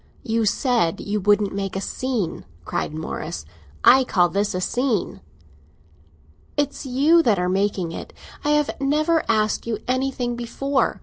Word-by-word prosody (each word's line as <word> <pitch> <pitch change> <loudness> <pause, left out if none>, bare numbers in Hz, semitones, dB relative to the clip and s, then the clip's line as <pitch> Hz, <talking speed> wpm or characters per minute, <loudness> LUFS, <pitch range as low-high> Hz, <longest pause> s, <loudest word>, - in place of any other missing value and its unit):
"You 225 -2 0
said 230 - +1
you 210 +1 -2
wouldn't 205 0 +2
make 195 -1 -3
a - - 0
scene!" 225 -3 -3 0.2
cried - - -2
Morris. 155 - -5 0.4
"I 265 +1 +7
call 180 -8 +2
this 200 +1 -1
a - - 0
scene." 225 - -1 1.4
"It's 290 -1 -1
you 290 +7 +4
that 225 -10 +2
are 180 0 0
making 190 -2 0
it! - - -7 0.3
I 295 - 0
have 295 -1 +2
never 310 +4 +2
asked 215 0 +1
you 225 -2 -1
anything 255 -1 -1
before. 265 +4 -1
225 Hz, 145 wpm, -23 LUFS, 195-265 Hz, 1.4 s, I